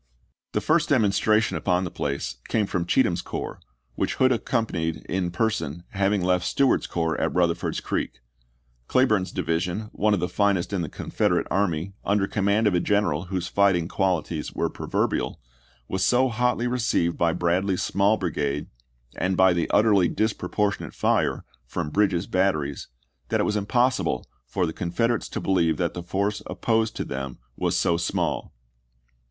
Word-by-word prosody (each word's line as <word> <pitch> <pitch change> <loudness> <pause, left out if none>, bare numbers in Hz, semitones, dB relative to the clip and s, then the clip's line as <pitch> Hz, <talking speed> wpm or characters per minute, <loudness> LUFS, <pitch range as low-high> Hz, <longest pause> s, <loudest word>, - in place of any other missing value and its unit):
The - - +1
first 165 +1 +2
demonstration 110 -3 +3
upon 90 -1 +1
the 90 - -4
place 70 -3 -3
came 110 -2 +1
from 90 -3 -2
Cheatham's - - +2
corps, - - -5 0.3
which - - -1
Hood 130 0 +4
accompanied 90 -10 -1
in 90 -1 -1
per 110 +6 +1
son, 80 -4 -4
having 100 -1 +1
left 90 0 +2
Stewart's 135 +8 +2
corps 80 -2 -1
at - - 0
Eutherford's 85 -1 +1
Creek; - - -3 0.7
Cleburne's 110 -8 +2
division, 90 +4 -2
one 105 0 +2
of - - -2
the 90 - 0
finest 100 -1 +1
in 95 - 0
the 80 - -3
Confederate - - 0
army, 95 -1 0
under 100 -1 +2
command 100 +2 +1
of 105 - +3
a 90 - +3
general 95 -4 +1
whose 90 -1 -3
fighting 95 -3 +2
qualities 85 -5 -1
were - - -1
proverbial, - - -1 0.5
was 95 0 -1
so 130 +1 +3
hotly 125 +1 0
received 120 -9 +1
by 85 -1 +2
Bradley's 90 +2 0
small 100 +2 +2
brigade, 75 -6 -2 0.5
and 95 0 0
by 95 -1 +6
the 85 -1 -1
utterly 100 -4 +4
disproportionate 105 -1 -1
fire - - +1 0.2
from 75 +4 -3
Bridges' 100 -2 +2
batteries, 75 -7 0 0.4
that - - +1
it - - +3
was 105 - 0
impossible 105 - +1 0.2
for 90 +9 0
the 80 - -3
Confeder 115 +8 0
ates - - -9
to - - -4
believe 85 -5 +2
that 85 -2 -1
the 90 - -5
force 100 +4 -1
opposed 110 -1 0
to - - -3
them 65 -1 -5 0.2
was - - 0
so 85 - +2
small. 85 - -1
95 Hz, 160 wpm, -25 LUFS, 85-105 Hz, 0.7 s, by